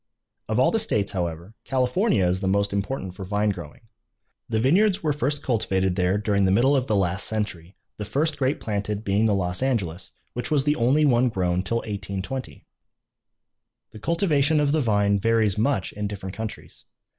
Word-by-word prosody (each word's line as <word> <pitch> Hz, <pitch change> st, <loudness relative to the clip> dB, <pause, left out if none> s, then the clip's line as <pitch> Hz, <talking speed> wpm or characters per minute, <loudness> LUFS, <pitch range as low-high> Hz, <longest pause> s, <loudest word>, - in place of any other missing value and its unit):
Of -, -, 0 dB
all -, -, +5 dB
of -, -, -4 dB
the -, -, +3 dB
states, 100 Hz, -2 st, 0 dB
however, 85 Hz, +1 st, -4 dB
California 130 Hz, -, +1 dB
is 90 Hz, +1 st, +1 dB
the 95 Hz, -, -2 dB
most 100 Hz, +1 st, +1 dB
important 100 Hz, -1 st, -3 dB
for 95 Hz, -, -8 dB
vine 105 Hz, +2 st, 0 dB
growing. 85 Hz, +2 st, -9 dB, 0.7 s
The 110 Hz, -1 st, 0 dB
vineyards 185 Hz, -, +3 dB
were 150 Hz, -2 st, +1 dB
first 145 Hz, 0 st, -1 dB
cultivated 95 Hz, -6 st, 0 dB
there 90 Hz, +1 st, +1 dB
during 100 Hz, -1 st, +1 dB
the 95 Hz, -, +3 dB
middle 130 Hz, +8 st, +4 dB
of 130 Hz, -1 st, 0 dB
the 105 Hz, -, +1 dB
last 95 Hz, -1 st, +2 dB
century, 100 Hz, -5 st, -4 dB, 0.2 s
the 105 Hz, -, -4 dB
first 145 Hz, +9 st, 0 dB
grape 135 Hz, +1 st, 0 dB
planted 105 Hz, 0 st, -3 dB
being 100 Hz, +1 st, +1 dB
the 105 Hz, -, +2 dB
Los 90 Hz, +1 st, -1 dB
Angeles, 100 Hz, -10 st, -2 dB, 0.2 s
which 125 Hz, -, -3 dB
was 145 Hz, -3 st, +2 dB
the 150 Hz, +1 st, +2 dB
only 135 Hz, +5 st, +3 dB
one 125 Hz, -2 st, +3 dB
grown 90 Hz, -4 st, 0 dB
till 115 Hz, +5 st, -1 dB
1820. 100 Hz, +5 st, -5 dB, 1.3 s
The 110 Hz, -, -11 dB
cultivation 155 Hz, -, +2 dB
of 145 Hz, -1 st, +2 dB
the 155 Hz, 0 st, +2 dB
vine 100 Hz, -4 st, +2 dB
varies 110 Hz, -1 st, +2 dB
much 115 Hz, -4 st, 0 dB
in 105 Hz, 0 st, -3 dB
different 95 Hz, -2 st, -6 dB
countries. 110 Hz, 0 st, -8 dB
105 Hz, 185 wpm, -24 LUFS, 95-130 Hz, 1.3 s, all